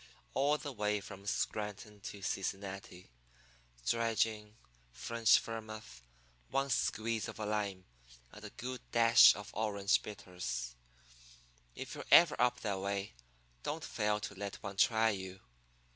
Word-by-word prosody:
all 145 +2 +3
the 145 - -6
way 105 -3 0
from 100 0 -10
Scranton 105 0 -3
to 100 0 -8
Cincinnati 95 -4 -4 0.7
dry 115 - +1
gin, 105 -1 0 0.4
French 115 - +3
vermouth, 110 - -7 0.5
one 135 +1 0
squeeze 115 -2 0
of - - -8
a 110 - -2
lime, 100 -3 -2 0.5
and - - -12
a - - -6
good 125 0 -6
dash 115 0 +8
of 105 -1 -8
orange 105 -2 +1
bitters. 90 - -5 1.0
If - - -6
you're - - -6
ever 170 -2 +8
up 125 0 +2
that 100 -3 -1
way, 100 +1 -3 0.5
don't - - -3
fail 105 0 0
to 105 - -5
let 100 0 -5
one 100 -1 -5
try 110 +1 +4
you. 95 -1 -6
105 Hz, 135 wpm, -34 LUFS, 100-115 Hz, 1.0 s, dash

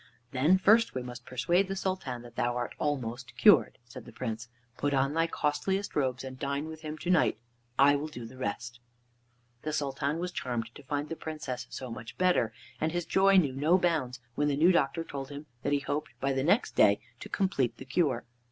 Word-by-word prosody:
"Then 150 +8 +4
first 220 - +4
we 130 - -2
must 125 0 -9
persuade 170 +10 +2
the 195 - -3
Sultan 185 -11 -3
that 120 -1 -13
thou 120 0 0
art 120 - -3
almost 125 -4 -3
cured," - - +6
said 120 - -10
the 120 - -11
Prince. 115 -1 -5 0.3
"Put 145 +1 0
on 135 +2 +2
thy 165 +1 +2
costliest 180 +7 -1
robes 130 -3 0
and 130 0 -8
dine 140 +1 -2
with 160 0 -8
him 155 0 -5
to 175 +3 -1
night, 175 -10 +3 0.4
and 140 +1 +7
I 145 - +5
will 145 +2 -2
do 120 -6 -8
the 120 +3 -11
rest." 120 +2 -4 0.8
The 155 - -3
Sultan 140 +1 -1
was 180 +1 -3
charmed 120 -7 -3
to - - -11
find 145 +2 -3
the 165 - -4
Princess 150 -7 -5
so 130 -2 -6
much 115 -1 -8
better, 180 -11 +3 0.3
and 160 - 0
his 175 0 -2
joy 195 0 +5
knew 145 -8 +4
no 155 +7 +3
bounds 155 -9 0
when 145 +3 +1
the 140 -1 +1
new 170 +5 +6
doctor 165 -1 +1
told 140 -4 -6
him 145 +1 -8 0.2
that 140 - -1
he 145 -1 +2
hoped 145 +2 -4
by 135 0 0
the 135 0 0
next 190 - +3
day 100 0 +5 0.2
to - - -8
complete 140 - 0
the 130 - -9
cure. 130 -4 +1
145 Hz, 215 wpm, -30 LUFS, 125-165 Hz, 0.8 s, and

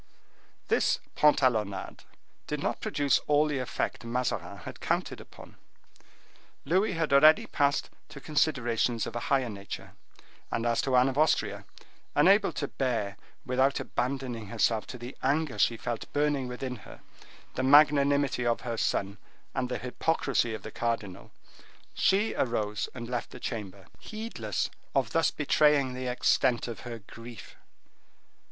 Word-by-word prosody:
This - - +2
pantalonnade 115 -10 +1 0.4
did - - -2
not - - -2
produce 140 -4 +2
all 150 +1 +4
the 150 -3 -1
effect 125 - -3
Mazarin 125 +1 -2
had - - -8
counted - - -2
upon. - - -14 1.1
Louis 190 +7 +2
had 165 -4 -1
already 155 +3 +7
passed 140 -1 0 0.2
to 140 - -10
considerations 125 -6 +1
of 115 - -7
a - - -1
higher 135 -2 +2
nature, 100 -3 -7 0.6
and 115 - -2
as 115 -1 +2
to 130 -2 0
Anne 125 +1 +5
of 135 +2 -1
Austria, 155 - +1 0.5
unable 195 +2 +5
to 145 - -3
bear, 115 -8 -2 0.3
without 130 +2 +2
abandoning 125 -3 -3
herself 110 0 0
to 125 - -7
the 120 +2 -8
anger 145 +1 0
she 115 - +3
felt 120 0 -5
burning 145 -3 +1
within 125 0 -5
her, - - -13 0.5
the - - -2
magnanimity 140 -1 +4
of 120 -1 +1
her 115 -2 -4
son 100 -1 -1 0.3
and 125 -1 -2
the 125 - -2
hypocrisy 130 -3 0
of - - -9
the 110 - -7
cardinal, 115 -6 -3 0.6
she 200 +3 +2
arose 105 -4 -1
and 120 -1 -6
left 120 0 -3
the - - -11
chamber, 100 -5 -6
heedless 215 - -4 0.2
of 130 -4 +1
thus 165 +2 +3
betraying 145 -2 +3
the 130 0 -4
extent 125 -1 +2
of 115 - -6
her 120 -2 -7
grief. 115 0 -11
125 Hz, 145 wpm, -29 LUFS, 115-145 Hz, 1.1 s, already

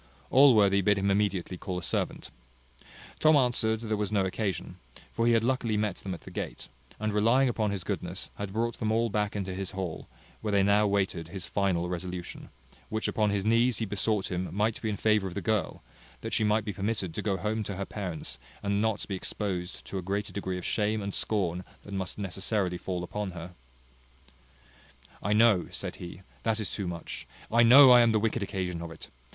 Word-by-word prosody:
Allworthy 110 -8 +6
bid 105 +1 +3
him 100 0 +1
immediately 95 -3 0
call 90 -2 -4
a 90 - -5
servant. - - -2 0.9
Tom 155 0 +6
answered 120 -4 +2
there 110 -2 -1
was 105 -1 -2
no 100 -3 +2
occasion; 95 -1 -3 0.4
for 115 +1 +1
he 120 - +5
had 115 -1 +3
luckily 120 -3 +1
met 105 -3 -1
them 95 -2 -5
at 85 - -12
the - - -11
gate, - - -5 0.3
and 110 0 -1
relying 115 +6 +4
upon 110 -3 0
his 100 -3 -3
goodness, - - -4
had 100 -1 -4
brought 115 +2 -1
them 110 -1 0
all 115 0 +1
back 105 0 -1
into 95 -2 -3
his 95 0 -4
hall, 95 -4 -4 0.3
where 110 - -2
they 100 -1 +4
now 105 +1 +4
waited 95 -5 0
his 90 +1 -6
final 90 -4 0
resolution, 90 0 -5 0.4
which 110 0 -1
upon 105 -1 +1
his 100 -1 -1
knees 115 +1 +3
he 110 - -1
besought 105 0 0
him 90 +1 -2
might 105 +3 0
be 110 - -1
in 105 - -2
favour 110 -1 +2
of 90 - -7
the - - -1
girl; 110 -3 -1 0.4
that - - -5
she - - +3
might 105 0 +2
be 105 - -3
permitted 100 -3 -2
to - - -3
go 100 -3 0
home 110 +3 -1
to 100 -2 -4
her 100 +1 -3
parents, 95 -7 -5 0.2
and 100 0 +1
not 110 -2 0
be 100 - -4
exposed 95 -2 -4
to 95 - -4
a - - -4
greater 100 +3 -3
degree 95 -2 -3
of 90 - -6
shame 105 0 0
and 100 0 -4
scorn 90 -4 -1 0.2
than 100 - -7
must 95 -2 -3
necessarily 95 -1 -1
fall 90 -2 -3
upon 100 +1 -4
her. 85 0 -7 1.7
"I 105 - +1
know," 105 -5 +5
said - - -5
he, 90 +1 -9 0.2
"that 110 -1 0
is 110 - -2
too 100 -3 -3
much. 85 -6 -6 0.2
I 115 +1 +5
know 130 +3 +9
I 125 -1 +9
am 115 -1 +4
the 110 - +3
wicked 115 +1 0
occasion 90 -4 -3
of 85 - -5
it. 80 - -10
100 Hz, 210 wpm, -29 LUFS, 95-110 Hz, 1.7 s, know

